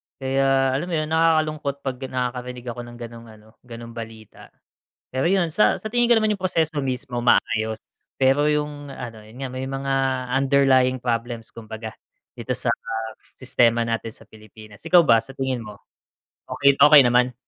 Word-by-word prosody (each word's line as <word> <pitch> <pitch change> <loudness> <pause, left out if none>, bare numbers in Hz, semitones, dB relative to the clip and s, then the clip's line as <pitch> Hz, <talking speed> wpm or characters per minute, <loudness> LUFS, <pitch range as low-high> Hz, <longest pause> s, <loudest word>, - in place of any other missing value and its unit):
Kaya 135 0 +1
alam 140 +7 -2
mo 175 - -2
'yun, 155 0 -2
nakakalungkot 155 -3 +1
'pag 130 -2 -4
nakakarinig 125 -1 -4
ako 120 - -9
ng 120 0 -9
gano'ng 115 -1 -10
ano, 110 -1 -16
ganong 115 -1 -10
balita. 115 -2 -10 0.6
Pero 130 +1 -2
'yun, 175 -1 +2
sa 210 - +2
sa 215 - -5
tingin 240 +2 +2
ko 240 - +4
naman 215 -2 +2
'yung 210 - 0
proseso 160 -4 0
mismo, 125 -1 -4
maayos 110 -2 +1 0.3
pero 135 +2 +3
'yung 150 -2 -2
ano, 115 -4 -9
'yun 115 +5 -13
nga 130 - -3
may 130 +1 -5
mga 135 0 -4 0.5
underlying 130 -2 +3
problems 115 -1 -3
kumbaga 110 -1 -9 0.4
dito 125 +2 -3
sa 125 - -3 0.6
sistema 120 -3 +1
natin 115 -1 -3
sa - - -18
Pilipinas. 110 -1 -15
Ikaw 180 -1 +6
ba, 115 -8 +5
sa 115 +4 -5
tingin 130 -3 -3
mo, 105 -1 -11 0.8
okey 140 0 +5
okey 145 -2 +8
naman? 125 +1 +2
130 Hz, 165 wpm, -23 LUFS, 115-140 Hz, 0.8 s, okey